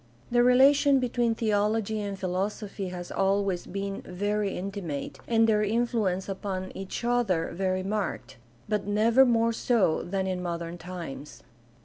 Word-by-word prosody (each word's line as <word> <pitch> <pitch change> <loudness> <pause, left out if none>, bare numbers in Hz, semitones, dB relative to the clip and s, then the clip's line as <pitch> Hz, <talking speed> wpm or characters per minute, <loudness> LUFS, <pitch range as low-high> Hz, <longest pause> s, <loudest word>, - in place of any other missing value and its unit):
The 240 0 +4
relation 270 +3 +5
between 240 -2 0
theology 215 0 0
and 200 -1 -4
philosophy 195 +2 -3
has 180 -1 -7
always 195 -2 0
been 195 +1 -4
very 205 +2 -2
intimate 185 -6 -5
and 225 -1 +4
their 210 -1 +3
influence 210 -4 0
upon 190 -1 -4
each 190 +4 -5
other 230 -9 +1
very 185 +1 -1
marked, 200 - -3 0.3
but 210 -1 -1
never 230 +5 +4
more 230 -1 +2
so 225 -8 +2
than 190 +1 -2
in 185 -1 -2
modern 170 -1 -4
times. 170 -6 -8
200 Hz, 135 wpm, -27 LUFS, 185-225 Hz, 0.3 s, relation